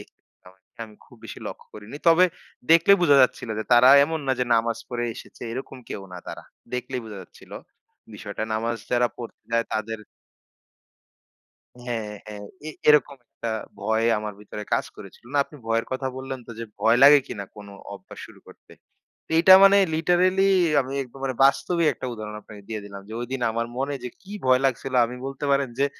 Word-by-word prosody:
দেখতাম। -, -, -18 dB, 0.6 s
আমি 105 Hz, -1 st, -15 dB
খুব -, -, -19 dB
বেশি -, -, -9 dB
লক্ষ্য -, -, -9 dB
করিনি। 105 Hz, +7 st, -10 dB
তবে 170 Hz, +2 st, +6 dB, 0.5 s
দেখলে 165 Hz, +4 st, +6 dB
বোঝা 145 Hz, -5 st, +5 dB
যাচ্ছিল 125 Hz, -2 st, 0 dB
যে 110 Hz, -, -3 dB
তারা 120 Hz, +2 st, +7 dB, 0.2 s
এমন 160 Hz, +1 st, -3 dB
না 130 Hz, -, +2 dB
যে 125 Hz, -, +1 dB
নামাজ 115 Hz, 0 st, 0 dB
পড়ে 120 Hz, -1 st, -3 dB
এসেছে। -, -, -12 dB
এরকম 130 Hz, +1 st, -7 dB
কেউ 100 Hz, -, -6 dB
না 90 Hz, -, -7 dB
তারা। -, -, -8 dB, 0.3 s
দেখলেই 125 Hz, +1 st, -4 dB
বোঝা 105 Hz, -3 st, -9 dB
যাচ্ছিলো -, -, -13 dB, 0.6 s
বিষয়টা, 105 Hz, +1 st, -6 dB
নামাজ 115 Hz, +1 st, -2 dB
যারা 120 Hz, 0 st, +3 dB
পড়তে 120 Hz, -2 st, -10 dB
যায় 115 Hz, 0 st, +2 dB
তাদের 110 Hz, +1 st, -3 dB, 1.8 s
হ্যাঁ, 115 Hz, -4 st, -4 dB, 0.2 s
হ্যাঁ, 105 Hz, -1 st, -8 dB, 0.3 s
এ -, -, -4 dB, 0.2 s
এরকম 150 Hz, -2 st, +4 dB
একটা 115 Hz, -, -6 dB, 0.3 s
ভয় 110 Hz, +1 st, 0 dB
আমার 105 Hz, -1 st, -5 dB
ভিতরে 105 Hz, 0 st, -8 dB
কাজ -, -, +2 dB
করেছিল। 100 Hz, +4 st, -13 dB
না, 145 Hz, -, +1 dB
আপনি 150 Hz, -, -15 dB
ভয়ের 115 Hz, 0 st, 0 dB
কথা 130 Hz, 0 st, -3 dB
বললেন 130 Hz, -1 st, -6 dB
তো, -, -, -10 dB
যে 115 Hz, -, -4 dB, 0.2 s
ভয় 115 Hz, +2 st, +4 dB
লাগে 145 Hz, +1 st, +9 dB
কিনা 100 Hz, -1 st, -6 dB
কোন 105 Hz, -1 st, -11 dB, 0.3 s
অভ্যাস -, -, -13 dB
শুরু -, -, -17 dB
করতে? -, -, -18 dB, 0.6 s
এইটা 185 Hz, +3 st, +8 dB
মানে 200 Hz, 0 st, +7 dB, 0.2 s
লিটারেলি 185 Hz, +4 st, +2 dB, 0.3 s
আমি 130 Hz, +1 st, -5 dB
একবারে 130 Hz, +1 st, -5 dB
বাস্তবিক 170 Hz, +4 st, +2 dB
একটা 130 Hz, -, -7 dB
উদাহরণ 105 Hz, -1 st, -7 dB
আপনাকে 105 Hz, -1 st, -13 dB
দিয়ে 110 Hz, -2 st, -5 dB
দিলাম। 100 Hz, -1 st, -9 dB
যে -, -, -9 dB
ঐদিন 130 Hz, +1 st, -4 dB
আমার 115 Hz, +1 st, -2 dB
মনে 140 Hz, +2 st, -2 dB
যে -, -, -3 dB
কি 195 Hz, +2 st, -12 dB
ভয় 130 Hz, 0 st, +4 dB
লাগছিল 135 Hz, 0 st, -1 dB
আমি 125 Hz, +2 st, -8 dB
বলতে 135 Hz, +1 st, -6 dB
পারেন 140 Hz, -2 st, +1 dB
যে 140 Hz, -, +3 dB
125 Hz, 180 wpm, -24 LUFS, 110-140 Hz, 1.8 s, লাগে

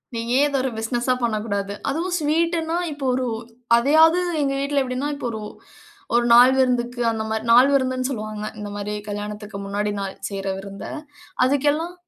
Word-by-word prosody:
நீ 230 Hz, -, -2 dB, 0.2 s
ஏன் 290 Hz, -, +5 dB
இத 280 Hz, -, -3 dB
ஒரு 265 Hz, -, -1 dB
பிசினஸா 240 Hz, +3 st, 0 dB
பண்ணக்கூடாது? 210 Hz, -3 st, -1 dB, 0.2 s
அதுவும் 350 Hz, +5 st, -1 dB
ஸ்வீட்ன்னா, 330 Hz, +2 st, 0 dB
இப்போ 285 Hz, -2 st, -5 dB
ஒரு 255 Hz, 0 st, 0 dB, 0.5 s
அதையாவது 320 Hz, +7 st, +5 dB, 0.2 s
எங்க 275 Hz, -1 st, 0 dB
வீட்ல 280 Hz, 0 st, +1 dB
எப்டின்னா, 255 Hz, +3 st, -3 dB
இப்போ 255 Hz, -, -4 dB
ஒரு 220 Hz, -1 st, -5 dB, 0.7 s
ஒரு 240 Hz, 0 st, +3 dB
நாள் 245 Hz, +2 st, +8 dB
விருந்துக்கு 245 Hz, -1 st, +1 dB
அந்த 220 Hz, -1 st, -3 dB
மாரி, 220 Hz, 0 st, -2 dB
நாள் 250 Hz, +4 st, +7 dB
விருந்துனு 260 Hz, -1 st, +1 dB
சொல்லுவாங்க, 215 Hz, -3 st, -5 dB
இந்த 205 Hz, 0 st, -5 dB
மாரி 205 Hz, +1 st, -4 dB, 0.2 s
கல்யாணத்துக்கு 210 Hz, 0 st, -6 dB
முன்னாடி 205 Hz, +1 st, -2 dB
நாள் 195 Hz, -1 st, -4 dB
செய்யுற 195 Hz, -1 st, -5 dB
விருந்த, 195 Hz, 0 st, -8 dB, 0.6 s
அதுக்கெல்லாம் 290 Hz, +6 st, +1 dB
250 Hz, 160 wpm, -22 LUFS, 210-280 Hz, 0.7 s, நாள்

